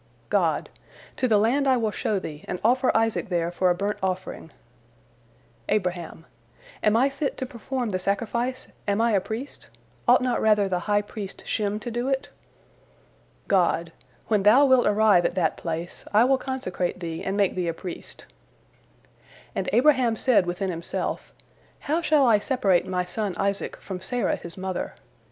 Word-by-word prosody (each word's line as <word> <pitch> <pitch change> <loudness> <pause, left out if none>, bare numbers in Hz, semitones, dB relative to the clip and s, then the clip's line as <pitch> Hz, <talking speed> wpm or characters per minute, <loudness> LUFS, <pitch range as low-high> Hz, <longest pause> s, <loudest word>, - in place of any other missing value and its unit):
God: - - +1 0.5
"To 255 - +1
the 220 -3 +4
land 250 +7 +2
I 260 -1 +4
will 220 -3 0
show 210 0 -1
thee, 155 -5 -6
and 180 - -3
offer 255 +3 +3
Isaac 225 -1 0
there 170 -2 0
for 180 +1 +1
a 175 - +3
burnt 200 +3 -2
offering." 185 -3 -3 1.2
Abraham: 180 -4 -2 0.6
"Am 215 +1 +3
I 260 +4 +4
fit 275 +1 -3
to 260 - -3
perform 250 -1 -4
the 185 - -1
sacrifice, 235 +6 -2 0.2
am 200 +1 +1
I 230 0 +3
a 200 -3 +3
priest? 230 +8 -7 0.4
Ought - - +6
not 250 -1 0
rather 210 -2 +4
the 180 -2 -1
high 205 0 +3
priest 205 -1 -8
Shem 210 -1 -1
to 240 - -5
do 240 +2 -2
it?" 270 -1 -1 1.2
God: 170 -3 +2 0.4
"When 210 -3 +2
thou 225 +8 +6
wilt 260 -2 +4
arrive 210 -3 +4
at - - 0
that 165 -4 +1
place, 165 +1 -5
I 215 +2 +5
will 265 +1 +3
consecrate 185 -10 -3
thee 165 -2 -5
and 195 +1 -2
make 200 -2 +2
thee 180 -2 -2
a 165 - 0
priest." 175 0 -8 1.3
And - - -2
Abraham 255 -3 +4
said 220 -6 +3
within 185 +2 -2
himself, 165 -1 -4 0.5
"How 315 +4 0
shall 300 -4 +4
I 225 -4 +5
separate 205 -7 +1
my 180 -1 -1
son 200 0 -3
Isaac 200 0 -1
from 185 -2 -7
Sarah 240 +6 -1
his 170 +1 -10
mother?" 190 -1 -4
210 Hz, 170 wpm, -25 LUFS, 185-245 Hz, 1.3 s, Ought